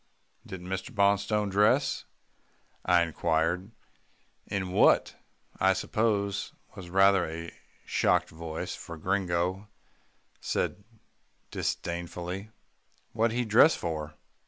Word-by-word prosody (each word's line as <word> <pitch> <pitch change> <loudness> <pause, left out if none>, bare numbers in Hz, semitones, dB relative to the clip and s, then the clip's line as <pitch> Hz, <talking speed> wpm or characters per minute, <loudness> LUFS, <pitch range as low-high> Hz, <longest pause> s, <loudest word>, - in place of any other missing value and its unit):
"Didn't 90 -2 -8
Mr. 95 +1 -4
Bonstone 100 -1 +1
dress?" 115 +8 +2 0.8
I 90 -1 +4
inquired, 85 +3 0 0.8
in 95 -2 -3
what, - - +4 0.4
I 95 0 +4
suppose, 100 -1 -1 0.2
was 90 -2 -9
rather 95 0 +4
a 85 +1 -7 0.3
shocked - - +1
voice, 80 0 -5
for 85 - -8
Gringo 95 +2 -1 0.7
said 100 - -2 0.7
disdainfully, 85 +3 -4 0.6
"What'd 115 +1 +1
he 125 - +1
dress 115 +9 +6
for? 75 -2 -4
95 Hz, 95 wpm, -28 LUFS, 85-100 Hz, 0.8 s, dress